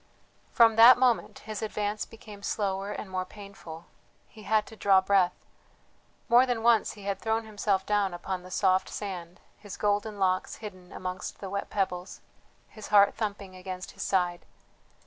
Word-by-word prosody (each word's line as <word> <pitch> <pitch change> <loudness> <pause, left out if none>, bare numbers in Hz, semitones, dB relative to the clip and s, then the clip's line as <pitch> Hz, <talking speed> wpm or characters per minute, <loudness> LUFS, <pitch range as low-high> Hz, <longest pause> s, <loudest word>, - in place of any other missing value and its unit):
From 225 -2 +5
that 235 +3 +9
moment 250 -2 +1
his 215 -1 -5
advance 210 -1 -3
became 215 -2 -12
slower 200 -1 -2
and 210 - -6
more 185 -1 -3
painful, 185 -4 -11 0.4
he 220 - -15
had 215 +1 +1
to 220 - -12
draw 195 -3 +4
breath; 190 -2 +1 0.8
more 245 +2 +6
than 240 -3 -1
once 230 -2 +3
he 205 - -13
had 200 0 -2
thrown 225 0 -1
himself 205 -3 -1
down 205 -2 +1
upon 180 +1 -4
the 180 - -12
soft 185 0 +2
sand, 180 -4 -6 0.2
his 205 -1 -9
golden 205 +1 0
locks 185 -1 0
hidden 185 -4 -10
amongst 185 0 -6
the 195 -2 -7
wet 200 0 -3
pebbles, 185 -2 -3 0.5
his 215 - -11
heart 200 -1 +5
thumping 200 -3 -5
against 185 0 -7
his - - -11
side. 180 -2 0
200 Hz, 165 wpm, -28 LUFS, 185-215 Hz, 0.8 s, that